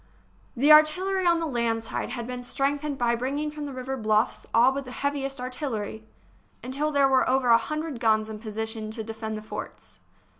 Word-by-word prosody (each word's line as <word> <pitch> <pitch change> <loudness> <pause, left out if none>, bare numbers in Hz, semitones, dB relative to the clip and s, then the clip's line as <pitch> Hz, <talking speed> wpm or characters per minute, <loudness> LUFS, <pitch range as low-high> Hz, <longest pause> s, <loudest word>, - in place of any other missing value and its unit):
The 280 +5 +4
artillery 360 +5 +5
on 340 -1 +4
the 330 - -1
land 235 -5 -1
side - - -4
had 235 -2 -4
been 250 0 -5
strength 275 +3 -1
ened 295 -2 -3
by 240 -1 +2
bringing 275 +5 -2
from 300 -1 -6
the - - -6
river 260 0 -4
bluffs 215 0 +1
all 240 +3 +5
but 275 +1 -3
the 255 - -10
heaviest 275 0 -2
artillery, 230 -4 -4 0.6
until 280 +5 -1
there 280 -2 +4
were 265 -1 +3
over 260 -1 +2
a 230 - +8
hundred 305 -3 -4
guns 220 -1 +2
in 215 -1 -7
position 220 0 -4
to 220 0 -5
defend 220 0 -5
the 215 - -8
forts. 215 - -8
255 Hz, 195 wpm, -26 LUFS, 225-285 Hz, 0.6 s, a